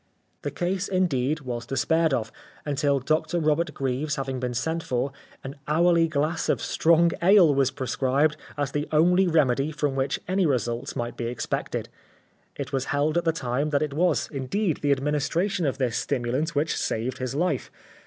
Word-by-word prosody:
The -, -, -3 dB
case, 185 Hz, +2 st, -2 dB
indeed, 155 Hz, -6 st, 0 dB
was 120 Hz, -3 st, -5 dB
despaired 160 Hz, +4 st, +1 dB
of, 115 Hz, -4 st, -1 dB, 0.3 s
until 145 Hz, -1 st, +1 dB
Dr 155 Hz, +5 st, 0 dB
Robert 155 Hz, +2 st, +1 dB
Greaves 135 Hz, +3 st, -1 dB
having 135 Hz, -2 st, -3 dB
been 125 Hz, -1 st, -3 dB
sent 160 Hz, +6 st, -1 dB
for, 130 Hz, -1 st, -1 dB, 0.3 s
an 135 Hz, +1 st, -7 dB
hourly 165 Hz, +2 st, +4 dB
glass 155 Hz, +1 st, -1 dB
of -, -, +2 dB
strong 170 Hz, +1 st, +3 dB
ale 180 Hz, -4 st, +6 dB
was 135 Hz, -2 st, +2 dB
prescribed 135 Hz, +3 st, 0 dB, 0.2 s
as 145 Hz, -2 st, -1 dB
the 145 Hz, +1 st, -2 dB
only 180 Hz, +5 st, +4 dB
remedy 145 Hz, -3 st, +2 dB
from 150 Hz, -2 st, -1 dB
which 135 Hz, 0 st, -1 dB
any 185 Hz, -1 st, +2 dB
results 120 Hz, -3 st, -1 dB
might 120 Hz, 0 st, -4 dB
be 120 Hz, -, -3 dB
expected. 120 Hz, 0 st, -3 dB, 0.7 s
It 140 Hz, 0 st, -6 dB
was 135 Hz, -1 st, 0 dB
held 145 Hz, +3 st, 0 dB
at 175 Hz, 0 st, +1 dB
the 165 Hz, -, +4 dB
time 140 Hz, -1 st, -2 dB
that 145 Hz, 0 st, +1 dB
it 150 Hz, -2 st, -3 dB
was, 175 Hz, +4 st, +1 dB
indeed, 155 Hz, +6 st, -1 dB
the 145 Hz, -, 0 dB
administration 150 Hz, +6 st, 0 dB
of 135 Hz, -, -1 dB
this 125 Hz, -4 st, 0 dB
stimulant 130 Hz, +7 st, -1 dB
which 150 Hz, +2 st, +1 dB
saved 120 Hz, +3 st, -2 dB
his 130 Hz, +1 st, -3 dB
life. 160 Hz, -4 st, 0 dB
145 Hz, 175 wpm, -25 LUFS, 130-165 Hz, 0.7 s, ale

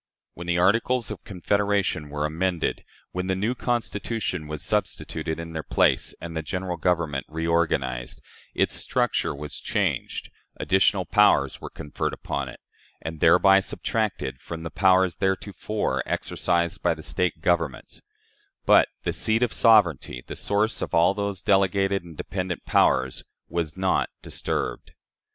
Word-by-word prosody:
When 85 Hz, +1 st, -8 dB
the 85 Hz, 0 st, +1 dB
Articles 115 Hz, +6 st, +2 dB
of -, -, -7 dB
Confederation 100 Hz, -4 st, 0 dB
were 75 Hz, +1 st, -2 dB
amended, 85 Hz, +2 st, -1 dB, 0.3 s
when 90 Hz, +1 st, -3 dB
the 95 Hz, -, +1 dB
new 105 Hz, +6 st, 0 dB
Constitution 115 Hz, -8 st, -2 dB
was 75 Hz, -1 st, -5 dB
substituted 80 Hz, 0 st, -2 dB
in 85 Hz, 0 st, -7 dB
their 80 Hz, -, -3 dB
place -, -, +2 dB
and 85 Hz, -1 st, -7 dB
the 80 Hz, -, -1 dB
General 90 Hz, +4 st, -3 dB
Government 85 Hz, -5 st, 0 dB
reorganized, 80 Hz, -7 st, -1 dB, 0.4 s
its -, -, +1 dB
structure -, -, 0 dB
was 75 Hz, 0 st, -6 dB
changed, -, -, -2 dB, 0.3 s
additional 95 Hz, 0 st, +2 dB
powers -, -, +3 dB
were -, -, -6 dB
conferred 75 Hz, -, -4 dB
upon 70 Hz, -2 st, -4 dB
it, -, -, -11 dB, 0.4 s
and 80 Hz, +1 st, -6 dB
thereby 95 Hz, +4 st, +6 dB
subtracted 95 Hz, -, -2 dB
from 80 Hz, -1 st, -7 dB
the 80 Hz, -, -5 dB
powers 95 Hz, -2 st, +4 dB
theretofore 95 Hz, +2 st, -1 dB
exercised 85 Hz, -1 st, 0 dB
by 85 Hz, -2 st, +2 dB
the 80 Hz, -, -11 dB
State 80 Hz, +4 st, -1 dB
governments; 85 Hz, -5 st, -1 dB, 0.6 s
but -, -, +6 dB, 0.2 s
the -, -, -1 dB
seat 110 Hz, +2 st, +2 dB
of 120 Hz, -, 0 dB
sovereignty 85 Hz, -, +3 dB
the -, -, -7 dB
source 105 Hz, +2 st, 0 dB
of -, -, -2 dB
all 85 Hz, +3 st, +5 dB
those 100 Hz, -2 st, -3 dB
delegated 95 Hz, -1 st, +2 dB
and 85 Hz, -3 st, -12 dB
dependent 90 Hz, -2 st, -4 dB
powers 65 Hz, 0 st, +2 dB, 0.3 s
was 85 Hz, -1 st, -3 dB
not 95 Hz, 0 st, +1 dB
disturbed. -, -, -3 dB
90 Hz, 140 wpm, -25 LUFS, 80-100 Hz, 0.6 s, thereby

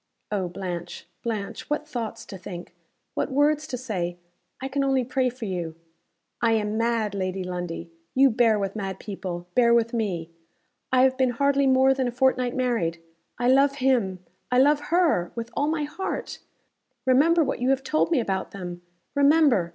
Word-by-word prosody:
"Oh, 195 Hz, -3 st, 0 dB
Blanche, 175 Hz, -1 st, -6 dB, 0.2 s
Blanche, 215 Hz, -4 st, -4 dB
what 300 Hz, 0 st, -1 dB
thoughts 240 Hz, -7 st, -5 dB
to -, -, -9 dB
think! 175 Hz, -1 st, -8 dB, 0.4 s
what -, -, -2 dB
words 295 Hz, +2 st, +2 dB
to 250 Hz, -, -4 dB
say! 180 Hz, -8 st, -3 dB, 0.4 s
I 265 Hz, -, -3 dB
can 275 Hz, +1 st, -1 dB
only 270 Hz, -1 st, +2 dB
pray 255 Hz, +1 st, +1 dB
for 245 Hz, -2 st, -7 dB
you." 175 Hz, -5 st, -3 dB, 0.7 s
"I 230 Hz, -1 st, +3 dB
am 210 Hz, -1 st, 0 dB
mad, 230 Hz, -2 st, 0 dB
Lady 185 Hz, -1 st, -2 dB
Lundie. 175 Hz, -2 st, -5 dB, 0.2 s
You 270 Hz, 0 st, +6 dB
bear 225 Hz, -2 st, +3 dB
with 195 Hz, 0 st, -2 dB
mad 195 Hz, -3 st, -4 dB
people. 185 Hz, -4 st, -5 dB
Bear 235 Hz, -1 st, +5 dB
with 230 Hz, 0 st, +1 dB
me. 180 Hz, -8 st, -2 dB, 0.6 s
I 255 Hz, 0 st, +5 dB
have 260 Hz, 0 st, +3 dB
been 260 Hz, -1 st, +4 dB
hardly 280 Hz, +3 st, +2 dB
more 265 Hz, 0 st, +5 dB
than 265 Hz, -1 st, -1 dB
a -, -, -1 dB
fortnight 255 Hz, 0 st, +1 dB
married. 230 Hz, -10 st, 0 dB, 0.4 s
I 245 Hz, -, 0 dB
love 275 Hz, +2 st, +4 dB
him 235 Hz, -9 st, +1 dB, 0.3 s
I 250 Hz, -, +3 dB
love 285 Hz, +3 st, +5 dB
her 330 Hz, -, +2 dB
with 230 Hz, 0 st, -5 dB
all 285 Hz, -, +1 dB
my 310 Hz, -1 st, 0 dB
heart. 305 Hz, +6 st, -4 dB, 0.7 s
Remember 310 Hz, +6 st, +5 dB
what 275 Hz, -, -2 dB
you 250 Hz, +1 st, +1 dB
have 270 Hz, 0 st, +2 dB
told 310 Hz, +3 st, +1 dB
me 330 Hz, -, +3 dB
about 190 Hz, -5 st, -2 dB
them. 175 Hz, -3 st, -7 dB, 0.3 s
Remember! 280 Hz, -, +4 dB
240 Hz, 175 wpm, -25 LUFS, 190-270 Hz, 0.7 s, You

